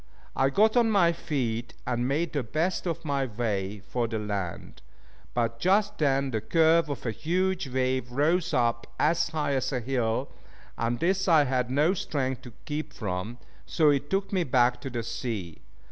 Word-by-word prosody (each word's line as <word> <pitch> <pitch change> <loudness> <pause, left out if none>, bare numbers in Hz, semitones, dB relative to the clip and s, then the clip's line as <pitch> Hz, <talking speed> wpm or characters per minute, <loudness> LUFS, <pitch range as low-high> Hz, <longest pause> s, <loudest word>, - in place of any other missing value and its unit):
I 135 +1 +3
got 215 - +3
on 235 -2 +4
my 190 -6 +4
feet 120 -8 -3
and 120 0 0
made 155 +5 -1
the 145 - 0
best 160 - -1
of 165 -1 -3
my 140 -2 0
way 105 -3 -2
for 120 -2 -1
the 110 0 -3
land; 100 -5 -4 0.5
but 115 -1 0
just 205 +3 +2
then 135 -2 +2
the 110 -2 -1
curve 165 +1 +3
of 140 - -5
a 115 - 0
huge 180 - -1
wave 130 -1 -1
rose 160 +7 +1
up 115 -1 +1
as 160 +2 +2
high 150 -3 -1
as 130 0 0
a 130 - 0
hill, 125 0 -1 0.4
and 115 +1 -1
this 190 +2 +1
I 160 -4 +6
had 125 -2 0
no 150 +7 +3
strength 135 -9 -2
to 125 - -11
keep 150 +1 -4
from, 105 +3 -4 0.3
so 155 -3 +4
it 145 0 -1
took 195 +1 -1
me 185 -2 +2
back 125 -3 +2
to 135 - -5
the 120 -2 -3
sea. 110 -8 -4
135 Hz, 180 wpm, -27 LUFS, 120-165 Hz, 0.5 s, I